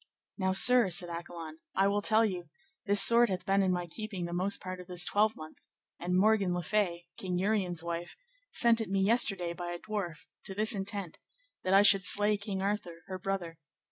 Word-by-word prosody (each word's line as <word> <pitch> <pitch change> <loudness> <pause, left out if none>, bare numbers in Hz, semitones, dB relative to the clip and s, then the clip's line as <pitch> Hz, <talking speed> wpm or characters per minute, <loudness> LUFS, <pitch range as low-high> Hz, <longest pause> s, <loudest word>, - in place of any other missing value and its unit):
Now, 190 -2 -1
sir, 240 +1 +6
said 175 0 +1
Accolon, 170 -2 -8 0.2
I 195 +1 +3
will 205 +1 0
tell 220 +2 +2
you; 180 -4 -5 0.4
this 200 0 +7
sword 235 0 +5
hath 185 -2 -4
been 195 +1 +2
in 190 -1 +1
my 175 -1 -2
keeping 195 0 -6
the 170 - -6
most 190 +3 -1
part 185 0 -7
of 180 - -11
this 180 -1 +1
twelvemonth; 205 -7 -2 0.3
and 180 +1 -1
Morgan 200 -2 +2
le 175 - -3
Fay, 175 -3 -1
King 180 -2 -4
Uriens' 185 -4 -1
wife, 170 0 -6 0.4
sent 235 -1 +3
it 220 - -5
me 195 0 0
yesterday 195 -5 +1
by 175 0 -7
a 175 - -5
dwarf, 195 -5 -6 0.2
to 190 - -4
this 215 +3 +1
intent, 195 -3 -6 0.4
that 185 +1 +1
I 200 - +6
should 195 -2 +6
slay 205 +4 +3
King 200 -2 -5
Arthur, 195 -5 -4
her 185 -1 -7
brother. 180 -4 -5
190 Hz, 200 wpm, -30 LUFS, 175-205 Hz, 0.4 s, this